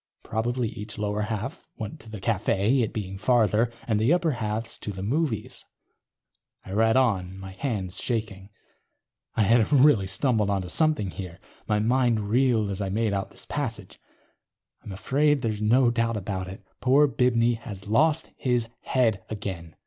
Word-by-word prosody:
Probably 120 +1 -1
each 110 -1 -8
lower 105 0 -1
half 110 +6 -4
went 110 +7 -6
to 115 - -12
the 110 -2 -7
cafe, 110 +4 +1
it 110 - -1
being 95 -3 -5
farther, 110 0 +3 0.2
and 110 -3 +1
the 115 +7 +3
upper 175 -2 +2
halves 115 -2 -3
to 105 - -4
the 95 -1 -6
movies. 125 -1 -2 1.0
I 95 - -9
read 110 +3 +3
on, 95 -7 +1 0.2
hands 100 -10 -3
shaking. 105 -5 -3 0.9
I 110 - +3
had 115 +4 +3
really 135 -8 +5
stumbled 105 +2 +1
onto 95 -3 -1
something 155 - +1
here. 90 -2 -8 0.3
My 105 - +2
mind 115 -2 +1
reeled 120 -4 +2
as 100 +1 -3
I 100 - -2
made 110 +1 0
out 100 0 -2
this - - -9
passage: - - -5
_... - - -39 0.8
I'm - - -8
afraid 140 +8 +1
there's 110 -2 -1
no 120 +3 +4
doubt 115 -1 0
about 95 -2 -4
it. 95 +2 -10
Poor 140 +3 +5
Bibney 120 -3 +2
has 105 -6 -8
lost 155 +8 +2
his 120 -3 0
head 115 -7 +1
again. 95 -6 -6
110 Hz, 165 wpm, -26 LUFS, 100-125 Hz, 1.0 s, really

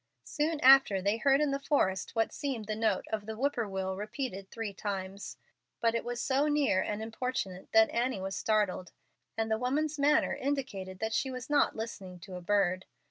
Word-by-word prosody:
Soon 305 +1 -1
after, 265 -7 +7
they 200 +4 +1
heard 275 +3 +3
in 295 -2 +2
the 275 - -1
forest 235 -10 0
what 225 0 +1
seemed 260 -7 -3
the 215 0 -3
note 220 +1 0
of 215 -1 -3
the 220 - -4
whippoorwill 210 -7 -1
repeated 210 -1 -5
three 225 -3 -5
times, 195 0 -5 0.4
but 230 -1 +2
it 230 - -1
was 240 0 -4
so 275 +4 +1
near 290 -10 +2
and 210 +2 -3
importunate 225 -5 -4
that 220 0 +5
Annie 240 -2 0
was 195 +1 -4
startled, 205 -4 0 0.4
and 225 0 -1
the 220 - +1
woman's 290 +5 -1
manner 300 +2 +3
indicated 255 -10 -3
that 220 0 -1
she 265 - 0
was 255 +1 -6
not 290 - +3
listening 200 -5 -6
to 185 - -10
a 180 - -6
bird. 185 -1 +1
225 Hz, 190 wpm, -31 LUFS, 195-270 Hz, 0.4 s, after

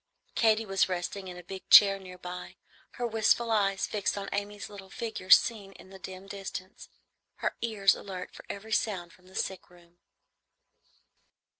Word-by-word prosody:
Katy 220 -1 +3
was 195 -1 +2
resting 185 +2 -3
in 180 -1 -8
a 180 - -10
big 190 +2 -9
chair 195 -1 +9
near 185 -1 -11
by, 180 0 -8 0.4
her 245 - -3
wistful 225 +1 +2
eyes 195 -3 +2
fixed 205 -1 -1
on 195 0 -4
Amy's 205 0 -3
little 195 -2 -11
figure 220 -4 -6
seen 215 -4 +5
in 190 - -15
the 190 - -11
dim 190 0 -9
distance, 195 -1 -8 0.5
her - - -2
ears 210 -4 +3
alert 185 -2 -7
for - - -11
every 215 +2 -7
sound 190 -5 -1
from 180 0 -22
the 190 - -16
sick 190 -2 -3
room. 175 0 -21
195 Hz, 165 wpm, -29 LUFS, 185-210 Hz, 0.5 s, chair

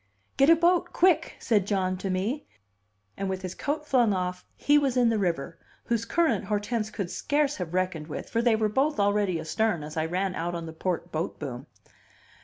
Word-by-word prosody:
"Get 275 +3 +5
a 330 - +9
boat, 345 +2 +2
quick," 360 -2 +3
said 210 -4 +1
John 185 -2 0
to 190 +1 -4
me; 205 +11 -2 0.7
and 195 0 -3
with 190 0 -3
his 185 -1 -4
coat 300 +6 -3
flung 245 -7 +3
off 180 0 -3
he 295 0 +4
was 270 -3 0
in 245 -2 +4
the 225 -2 +1
river, 165 -4 -2 0.2
whose 230 -1 -1
current 340 +4 +1
Hortense 215 +1 -1
could 200 -4 -4
scarce 290 0 0
have 180 -2 -4
reckoned 185 -4 -1
with; 155 - -6
for 230 - 0
they 235 -2 +4
were 220 0 +1
both 270 +7 +1
already 200 -3 +2
astern 165 +2 0
as 155 +2 -8
I 155 - +1
ran 185 +2 -1
out 175 0 -3
on 170 -1 -4
the 160 - -8
port 175 +1 -3
boat 160 +2 -3
boom. 130 -3 -6
200 Hz, 205 wpm, -27 LUFS, 180-245 Hz, 0.7 s, a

